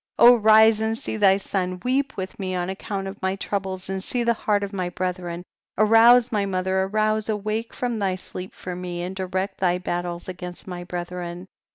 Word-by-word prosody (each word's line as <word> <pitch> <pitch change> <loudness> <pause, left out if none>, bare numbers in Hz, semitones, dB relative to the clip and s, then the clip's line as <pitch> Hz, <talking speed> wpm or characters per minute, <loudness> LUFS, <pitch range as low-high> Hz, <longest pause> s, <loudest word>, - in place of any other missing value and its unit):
32. 240 +1 +8
rise 220 0 +6
and 220 0 0
see - - -5
thy 195 -3 +5
son, 185 -2 -2
weep 270 +2 0
with 190 -1 -5
me 185 -1 -2
on 180 +1 -2
account 195 0 -4
of 195 +1 -8
my 190 0 0
troubles, 190 -2 -4
and 190 0 -3
see 245 +3 -1
the 235 0 +3
heart 210 -2 0
of 200 0 -5
my 185 -2 -2
brethren. 180 -1 -4 0.3
33. 215 +1 +3
Arouse 235 +2 +7
my 210 -3 +1
mother, 190 -1 0
arouse, 215 +2 0
awake 215 +2 -2
from 240 -3 -3
thy 190 -2 0
sleep 185 0 -7
for 180 -1 -6
me, 175 -1 -5
and 185 +2 -5
direct 190 +1 -3
thy 180 -1 +2
battles 175 -1 -4
against 180 -1 -7
my 180 -1 -6
bre 175 0 -4
thren. 175 0 -6
190 Hz, 205 wpm, -24 LUFS, 180-215 Hz, 0.3 s, 32